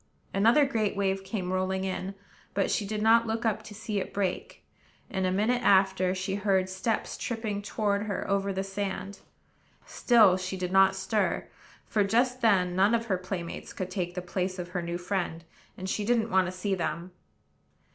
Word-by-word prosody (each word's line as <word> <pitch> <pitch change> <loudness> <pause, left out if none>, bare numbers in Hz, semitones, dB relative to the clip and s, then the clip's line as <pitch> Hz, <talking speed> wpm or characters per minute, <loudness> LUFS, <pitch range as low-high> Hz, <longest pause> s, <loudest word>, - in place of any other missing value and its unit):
Another 230 +9 +5
great 220 -7 0
wave 195 -1 0
came 190 -2 -3
rolling 190 0 0
in; 190 +1 -3 0.4
but 195 - +1
she 205 - 0
did 215 0 -2
not 230 +1 +5
look 225 +1 -2
up 220 -1 +1
to 215 -1 -11
see 215 -1 -3
it 190 - -6
break, 190 -3 -3 0.5
and, 190 -1 0
a - - +1
minute 220 +6 +1
after, 190 -1 +3
she 190 +1 -3
heard 195 -2 +1
steps 190 +4 -2
tripping 220 -4 -3
toward 205 0 -1
her 200 - -3
over 200 0 0
the 190 0 -2
sand. 195 0 -4 0.7
Still 215 -7 +4
she 185 0 -4
did 180 -1 -3
not 195 0 +5
stir; 205 +1 -1 0.4
for, 210 -2 +1
just 245 +5 +1
then, 185 -6 +3
none 200 +5 +4
of 230 0 -1
her 195 -5 0
playmates 185 -2 -6
could 185 -1 -5
take 180 -2 -3
the 180 - -4
place 185 +1 -2
of 175 -1 -5
her 180 0 -3
new 170 0 -3
friend, 175 -2 -3 0.3
and 185 - -5
she 205 +2 -1
didn't 230 0 +1
want 190 -1 +3
to - - -3
see 185 +2 -2
them. 170 0 -3
195 Hz, 185 wpm, -28 LUFS, 185-215 Hz, 0.7 s, Another